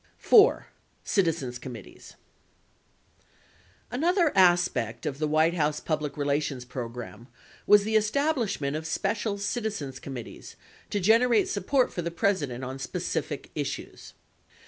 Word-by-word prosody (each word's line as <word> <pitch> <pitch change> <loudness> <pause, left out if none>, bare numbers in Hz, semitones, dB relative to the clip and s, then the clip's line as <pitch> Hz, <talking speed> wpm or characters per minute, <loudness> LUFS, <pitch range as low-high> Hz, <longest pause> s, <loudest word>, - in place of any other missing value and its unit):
4. 430 0 +5 0.4
CITIZENS 160 - 0
COMMITTEES 120 -5 -11 1.8
Another 335 +5 +2
aspect 175 - +3
of 145 -2 -3
the 155 - 0
White 155 +2 +3
House 150 -3 0
public 155 -2 -3
relations 140 -3 -1
program 120 -1 -7 0.4
was 205 -1 +7
the 220 +1 -1
establishment 215 - 0
of 160 +1 -4
special 205 +4 -1
citizens 200 - -3
committees 130 -4 -9 0.3
to 205 - -1
generate 225 +3 +4
support 250 +7 +1
for 175 - -3
the 170 - -3
President 165 - -1
on 130 +1 -6
specific - - -4
issues. - - -6
165 Hz, 115 wpm, -27 LUFS, 135-210 Hz, 1.8 s, was